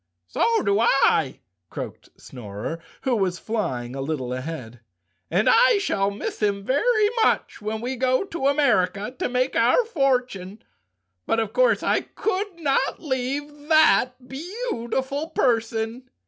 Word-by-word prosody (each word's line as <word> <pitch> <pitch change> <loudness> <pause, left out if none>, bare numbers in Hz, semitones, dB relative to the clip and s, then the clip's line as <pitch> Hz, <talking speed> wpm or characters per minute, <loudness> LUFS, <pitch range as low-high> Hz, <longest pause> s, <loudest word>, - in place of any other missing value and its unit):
"So 230 - +1
do 200 0 +2
I," 225 - +3 0.3
croaked - - -8
the - - -29
Snorer, 110 +6 -7 0.2
who 260 -3 +1
was 190 -4 0
flying 135 - -3
a 135 - -4
little 135 -4 -3
ahead, 130 -4 -6 0.5
"and 185 +6 +1
I 485 -1 +6
shall 200 - 0
miss 200 +1 -5
him 200 -1 0
very 425 - +3
much - - 0
when 215 +1 -3
we 255 +2 -3
go 255 +3 +2
to 335 -8 -2
America 245 -6 +1
to - - -1
make 255 +1 0
our 245 - +4
fortune. 250 - -1 0.6
But, 225 - +2
of 225 - -2
course - - +3
I - - +2
could 400 -3 -3
not 280 -4 0
leave 290 +1 -4
that 255 -5 +4
beautiful 285 - -3
person." 230 -2 -1
245 Hz, 140 wpm, -24 LUFS, 200-290 Hz, 0.6 s, I